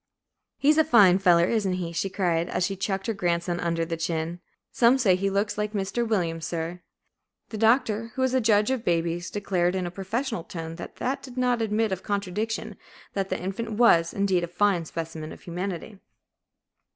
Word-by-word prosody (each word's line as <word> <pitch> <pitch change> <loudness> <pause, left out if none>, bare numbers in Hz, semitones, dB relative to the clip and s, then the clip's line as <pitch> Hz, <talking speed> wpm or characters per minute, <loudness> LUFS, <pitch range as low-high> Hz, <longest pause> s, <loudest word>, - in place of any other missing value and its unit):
"He's 300 +3 +4
a - - +7
fine 205 - +6
feller, 175 -3 +5
isn't 205 -3 0
he?" 180 -2 -3
she 180 +3 -2
cried, 175 -3 0
as 180 - 0
she 195 - -2
chucked 195 0 -2
her 225 - 0
grandson 175 -2 -1
under 165 -1 -1
the 165 0 -3
chin; 165 +1 -3 0.3
"some 245 +2 +4
says 220 -8 +4
as 180 - 0
he 195 +1 +1
looks 200 +2 -1
like 210 0 -2
Mr. 205 +4 -1
Williams, 170 -7 -1
sir." 170 +1 -4 0.7
The 215 - -6
Doctor, 225 -1 +2
who 260 - 0
is 260 -1 +1
a 260 - +3
judge 215 +1 +3
of 260 -3 -1
babies, 170 0 0
declared, 185 -3 0
in 185 -1 -1
a 175 - -4
professional 210 +3 -3
tone 165 -1 -7
that - - -8 0.3
did 255 -2 -11
not 250 -2 +1
admit 220 0 0
of 190 -1 -2
contradiction, 205 +2 -3 0.4
that 195 -1 -2
the 185 - -2
infant 195 +5 -4
was, 170 -7 +4
indeed, 195 -3 +1
a - - -2
fine 180 -1 +1
specimen 160 -1 -6
of - - -11
humanity. 180 +3 -5
195 Hz, 190 wpm, -26 LUFS, 175-220 Hz, 0.7 s, a